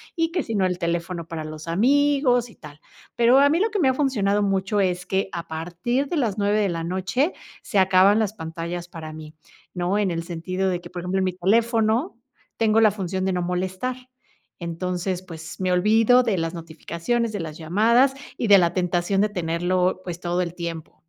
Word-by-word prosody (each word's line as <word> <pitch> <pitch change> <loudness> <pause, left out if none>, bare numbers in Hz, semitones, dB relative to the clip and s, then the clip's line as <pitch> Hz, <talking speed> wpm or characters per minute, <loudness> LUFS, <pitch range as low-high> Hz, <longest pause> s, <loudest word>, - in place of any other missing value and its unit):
y 330 -1 0
que 350 0 0
si 225 - -4
no, 195 -2 +2
el 180 -1 -1
teléfono 170 0 -3
para 165 -2 -5
los 155 +1 -8
amigos 255 - +2
y - - -17
tal. 150 -1 -13 0.4
Pero 240 +3 +5
a 285 +1 +5
mí 320 +4 +2
lo 430 +4 +2
que 430 - -3
me 280 -7 +4
ha - - +2
funcionado 210 -8 +1
mucho 195 +1 0
es 180 -2 0
que 190 +1 0
a 170 -1 -5
partir 175 - -2
de 345 - -3
las 225 -8 0
9 205 0 +1
de 205 -2 +1
la 165 -1 -3
noche 190 - 0 0.3
se 210 - -3
acaban 190 +2 +5
las 215 -3 0
pantallas 170 -1 -6
para 160 -3 -8
mí, 155 0 -10 0.4
¿no? 180 +3 0
En 205 -3 +1
el 165 0 -3
sentido 185 +3 -2
de 180 -1 -1
que, - - -11
por 180 -1 -6
ejemplo, 180 +2 -2
en 190 - +1
mi 185 - -1
teléfono 225 - +1 0.4
tengo 225 -1 +3
la 220 -2 +5
función 190 -2 -3
de 190 - 0
no 180 - -1
molestar. 185 +7 -2 0.6
Entonces, 180 +2 -3
pues, 165 -3 -9
me 185 -1 0
olvido 225 +6 +4
de 220 -6 0
las 165 -1 -2
notificaciones, 170 +7 -3
de 205 - -3
las 155 -2 -6
llamadas 225 - +3 0.2
y 235 - -1
de 200 -1 +8
la 170 -1 +2
tentación 180 +1 0
de 210 - +3
tenerlo, 180 0 0
pues, 175 -1 -5
todo 175 0 -1
el 170 -2 -3
tiempo. 170 -2 -6
185 Hz, 210 wpm, -23 LUFS, 170-225 Hz, 0.6 s, de